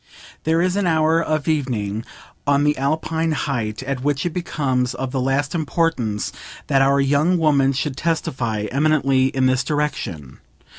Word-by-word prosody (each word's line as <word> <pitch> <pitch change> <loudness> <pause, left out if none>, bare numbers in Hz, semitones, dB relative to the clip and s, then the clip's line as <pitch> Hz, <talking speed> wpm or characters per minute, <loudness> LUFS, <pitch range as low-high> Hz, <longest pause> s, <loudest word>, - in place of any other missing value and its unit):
There 165 +2 +2
is 185 0 +1
an 200 -3 +1
hour 160 0 +3
of 155 -2 -1
evening, 115 -9 -1 0.4
on 140 0 +3
the 150 0 +2
alpine 160 +3 -1
height, 120 -5 -2
at 135 -1 -3
which 145 +1 0
it 175 - 0
becomes 135 -8 -1
of 130 -1 -4
the 130 -1 -1
last 135 +2 0
importance 155 -10 -1 0.3
that 135 -2 +2
our 140 +1 +4
young 145 +6 +2
woman 145 -4 +3
should 140 0 -2
testify 130 -9 -1
eminently 140 -2 +2
in 130 -1 0
this 130 0 +2
direction. 125 - -3
140 Hz, 155 wpm, -21 LUFS, 130-155 Hz, 0.4 s, our